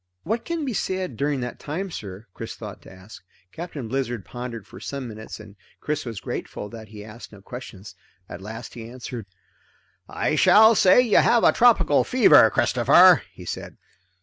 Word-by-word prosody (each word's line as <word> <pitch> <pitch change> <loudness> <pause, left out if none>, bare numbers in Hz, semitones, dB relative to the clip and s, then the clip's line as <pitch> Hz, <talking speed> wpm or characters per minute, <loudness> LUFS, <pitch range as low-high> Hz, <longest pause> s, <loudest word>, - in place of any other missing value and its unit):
What 230 +2 -3
can 335 -3 -3
be 255 - -3
said 185 - -3
during 140 +1 -1
that 125 - -6
time, 180 +6 -5
sir?" 100 - -8
Chris - - -8
thought - - -9
to - - -15
ask. 95 +2 -14 0.3
Captain 160 -7 -7
Blizzard 120 -4 -3
pondered 120 -3 -7
for - - -13
some 140 -3 -6
minutes, 110 -1 -9
and 105 -2 -13 0.2
Chris 150 -1 -3
was 115 -3 -6
grateful 105 - -6
that 110 -1 -11
he 105 0 -11
asked 110 +2 -12
no 105 - -14
questions. 100 -2 -10 0.3
At 90 - -9
last 110 +4 -9
he 115 -1 -9
answered. 120 -3 -8 0.8
"I - - -1
shall 220 +2 +6
say 190 +2 +5
you 235 -4 +2
have 235 -1 +4
a - - +6
tropical 190 -12 +4
fever, 255 -1 +6
Christopher," - - +5
he - - -13
said. - - -7
125 Hz, 175 wpm, -23 LUFS, 110-185 Hz, 0.8 s, shall